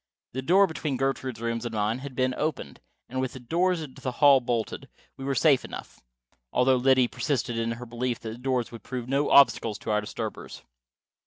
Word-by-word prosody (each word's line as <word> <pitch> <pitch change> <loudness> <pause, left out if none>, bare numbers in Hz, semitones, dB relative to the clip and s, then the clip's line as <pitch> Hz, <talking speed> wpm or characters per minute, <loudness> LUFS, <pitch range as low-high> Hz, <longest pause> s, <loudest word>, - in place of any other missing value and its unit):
The 130 - -3
door 185 +8 +5
between 155 -5 -3
Gertrude's 130 -3 -2
rooms 115 0 -2
and 120 -2 -4
mine 105 +3 0
had 135 -1 -8
been 130 0 +1
opened, 150 +2 -3 0.3
and, 130 +1 -3
with 130 -2 -3
the 130 - -8
doors 170 +6 0
into 135 -2 -11
the 130 -1 -3
hall 140 +1 +6
bolted, 120 -3 -3 0.3
we 135 - -9
were 135 0 -1
safe 145 -4 +4
enough. - - -9 0.5
Although 130 +1 +3
Liddy 130 0 +4
persisted 125 -3 -2
in 115 0 -1
her 120 +1 -8
belief 120 +1 -3
that 115 +2 -7
doors 125 -2 -1
would 115 - -9
prove 125 -2 -5
no 140 +2 +1
obstacles 115 -6 +5
to - - -4
our 105 0 +2
disturbers. 105 - -6
130 Hz, 195 wpm, -27 LUFS, 120-135 Hz, 0.5 s, hall